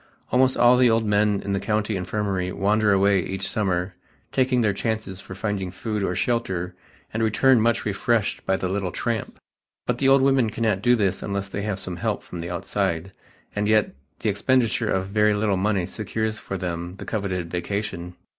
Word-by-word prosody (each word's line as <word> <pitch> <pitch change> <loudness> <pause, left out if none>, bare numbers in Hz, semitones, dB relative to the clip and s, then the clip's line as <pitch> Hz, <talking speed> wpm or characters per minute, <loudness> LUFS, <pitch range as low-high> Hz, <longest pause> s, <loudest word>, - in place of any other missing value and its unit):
Almost 130 +1 +3
all 120 +1 +6
the 125 -1 +5
old 115 0 +2
men 105 -1 +2
in 100 - -1
the 100 - 0
County 105 0 -1
Infirmary 95 -1 -2
wander 105 +2 +2
away 100 0 +4
each 95 +2 -3
summer 95 -3 -1 0.4
taking 130 -1 +2
their 105 -3 +2
chances 105 -2 -3
for 95 - -9
finding 100 -2 -2
food 105 +3 -3
or 90 -1 -1
shelter 95 -4 -1 0.4
and 115 - -1
return 115 +3 +4
much 115 +1 +1
refreshed 105 +1 0
by 95 - +2
the 95 - -2
little 95 -1 -2
"tramp," 115 +3 -3 0.5
but - - -1
the 135 - +4
old 135 0 +6
women 135 -4 +3
cannot 110 -3 0
do 120 +3 +4
this 100 -5 0
unless 100 -1 -3
they 100 - -4
have 105 -2 -2
some 90 -2 -4
help - - -2
from 85 - -7
the 85 - -5
outside, 95 0 -2 0.4
and 105 0 0
yet 110 -1 +3 0.3
the 110 - +1
expenditure 115 +1 +1
of 95 - +1
a - - -7
very 105 +1 +2
little 105 -1 +1
money 95 -1 +1
secures 110 +3 -3
for 95 - -5
them 85 0 -4
the - - -9
coveted 95 -5 -3
vacation. 90 -1 -3
100 Hz, 195 wpm, -24 LUFS, 95-110 Hz, 0.5 s, all